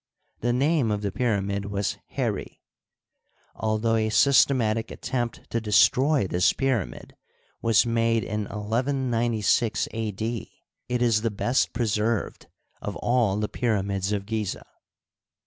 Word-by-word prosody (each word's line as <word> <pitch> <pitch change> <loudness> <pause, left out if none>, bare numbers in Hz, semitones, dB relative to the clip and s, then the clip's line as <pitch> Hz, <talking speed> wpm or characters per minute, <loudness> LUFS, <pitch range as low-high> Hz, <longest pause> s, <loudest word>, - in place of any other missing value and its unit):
The 120 - 0
name 140 0 +2
of 105 0 -1
the 100 - -1
pyramid 100 -3 -1
was 100 -1 -2
Heri, - - -3 0.9
Although 110 +1 0
a 110 0 +1
sys 115 +5 +5
tematic 115 -5 0
attempt 120 -3 -4
to 115 - 0
destroy 130 +5 +4
this 90 -1 +2
pyramid 120 - -2 0.5
was 115 +1 +4
made 115 -1 +1
in 105 0 -3
11 125 +6 -1
96 115 -1 +1
A. 110 -1 -2
D., 110 +2 -5 0.3
it 125 0 +1
is 115 -3 +3
the 115 - 0
best 120 +5 0
preserved 110 -1 -1 0.3
of - - -4
all 120 -5 +1
the 105 0 -1
pyramids 100 -5 -1
of 100 -2 -2
Gizeh. 110 -2 -3
110 Hz, 130 wpm, -25 LUFS, 105-120 Hz, 0.9 s, sys